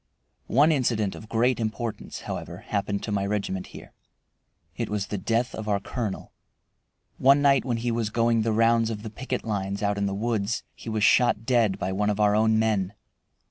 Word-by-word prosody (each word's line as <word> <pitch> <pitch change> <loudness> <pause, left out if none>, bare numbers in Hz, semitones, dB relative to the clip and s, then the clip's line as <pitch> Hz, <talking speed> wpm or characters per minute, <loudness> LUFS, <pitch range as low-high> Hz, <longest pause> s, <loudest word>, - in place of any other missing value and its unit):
One 145 +6 +4
incident 115 -8 +1
of 110 - -11
great 120 +2 +2
importance, 110 0 -4
however, - - -6
happened 100 -1 -2
to 110 - -4
my 100 -1 0
regiment 100 -2 -2
here. - - -12 0.8
It - - -3
was 105 -2 -1
the 105 - -4
death 115 +5 0
of 110 -1 -6
our 100 -1 +2
colonel. 110 -2 -5 0.9
One 140 +2 +5
night 140 -3 +4
when 120 -3 0
he 120 +1 -1
was 115 -2 -1
going 115 +1 +2
the 115 +1 0
rounds 115 +1 +3
of 105 -2 -5
the 110 - -6
picket 130 +3 -4
lines 100 -2 -3
out 100 0 0
in 100 - +1
the 100 - -2
woods 110 0 -1
he - - -9
was 110 -1 -1
shot 115 -1 +4
dead 115 -6 +2
by 90 - -2
one 105 +2 0
of 105 0 -1
our 105 -1 +4
own 110 0 +3
men. 105 -3 0
110 Hz, 195 wpm, -26 LUFS, 100-115 Hz, 0.9 s, One